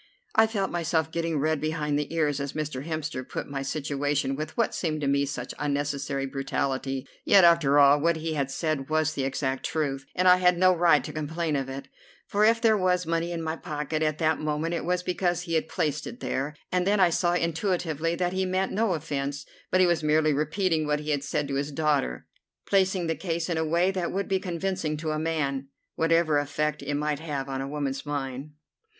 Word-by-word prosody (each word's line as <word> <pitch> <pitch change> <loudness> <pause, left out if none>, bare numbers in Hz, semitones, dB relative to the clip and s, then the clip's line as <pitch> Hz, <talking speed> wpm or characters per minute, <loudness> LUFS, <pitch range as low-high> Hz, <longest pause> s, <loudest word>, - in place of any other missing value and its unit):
I 220 - +5
felt 200 -3 -2
myself 160 -2 0
getting 165 -1 -1
red 155 +1 0
behind 150 -2 -1
the 150 - -4
ears 150 -3 +1
as 140 0 -4
Mr. 150 -4 -3
Hemster 155 -5 -3
put - - -5
my 140 -1 -4
situation 140 -1 -1
with, 155 +2 -6
what 230 - +1
seemed 155 -3 -2
to 140 - 0
me, 140 0 +2
such 125 -3 -5
unnecessary 140 -1 -1
brutality. 135 0 -2 0.2
Yet, 195 -2 +6
after 170 -5 +5
all, 145 0 +7
what 170 +1 +3
he 160 0 -3
had 140 -3 -1
said 145 -1 -2
was 155 0 +1
the 140 - -2
exact 135 0 -2
truth, 135 -4 -2
and 185 +1 +2
I 180 0 +8
had 180 -1 +3
no 185 +1 +5
right 165 -5 +4
to - - -7
complain 155 +1 -2
of 135 -1 -2
it, 135 +1 -6 0.4
for 205 -1 +1
if 225 +1 +5
there 225 -2 +4
was 180 -2 +1
money 165 +1 -1
in 165 -1 -3
my 160 0 -2
pocket 150 0 -3
at 155 -1 +1
that 160 -1 +1
moment 155 +2 -1
it 170 - -2
was 180 +1 0
because 175 -1 0
he 170 -2 -5
had 160 0 0
placed 150 -2 -1
it 240 - -8
there; 140 +3 -2 0.2
and 180 0 +1
then 205 0 +3
I 180 -2 +5
saw 175 +1 +1
intuitively 165 -2 -1
that 180 0 -1
he 190 0 0
meant 185 +1 0
no 210 -3 +1
offence, 145 -2 -3 0.2
but 185 0 +4
was 170 -2 +2
merely 155 0 +3
repeating 155 +2 0
what 150 0 0
he 150 0 -3
had 145 -1 0
said 145 0 -1
to - - -2
his 140 +2 -1
daughter, 145 - 0 0.4
placing 190 -2 +2
the 165 - 0
case 165 +1 -3
in 165 - 0
a - - +1
way 170 +4 +2
that 185 -3 -2
would 195 +1 -2
be 190 -1 +1
convincing 180 -3 -2
to 155 0 -3
a 155 - -1
man, 140 -4 -1 0.3
whatever 165 -2 +3
effect 150 +1 -1
it 145 +1 -2
might 150 0 -1
have 145 -4 -4
on 135 -1 -3
a 135 - -4
woman's 140 -2 -3
mind. 140 0 -4
155 Hz, 215 wpm, -27 LUFS, 145-170 Hz, 0.4 s, I